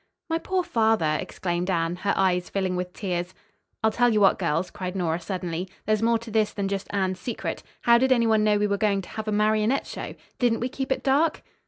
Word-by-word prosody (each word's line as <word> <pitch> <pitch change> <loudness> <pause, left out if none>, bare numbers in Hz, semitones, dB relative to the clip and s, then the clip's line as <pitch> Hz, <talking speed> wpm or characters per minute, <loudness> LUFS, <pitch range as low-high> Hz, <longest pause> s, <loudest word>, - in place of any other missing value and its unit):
"My 325 - +1
poor 370 +1 -1
father!" 220 - +2
exclaimed 175 0 -3
Anne, 170 -1 0
her 200 +2 0
eyes 180 -2 +1
filling 190 -2 -1
with 180 0 -3
tears. 180 -2 -3 0.5
"I'll 220 - +4
tell 245 +2 +3
you 215 - +3
what, 195 -2 +4
girls," 170 0 0
cried 185 -1 -5
Nora 170 -3 0
suddenly, 180 0 -4 0.2
"there's 215 0 +1
more 230 0 +3
to 230 0 -10
this 215 -1 +2
than 200 -1 -2
just 195 0 -3
Anne's 190 -2 -1
secret. 240 - -4 0.2
How 235 0 +5
did 260 +1 +2
anyone 225 -3 +4
know 210 -1 +3
we 205 - +1
were 200 -1 0
going 200 -2 +1
to - - -12
have 220 0 -6
a - - 0
marionette 215 +4 +2
show? - - -7 0.2
Didn't 240 -2 +2
we 245 - -2
keep 265 +1 -4
it - - 0
dark?" 295 +4 +2
205 Hz, 220 wpm, -25 LUFS, 180-225 Hz, 0.5 s, How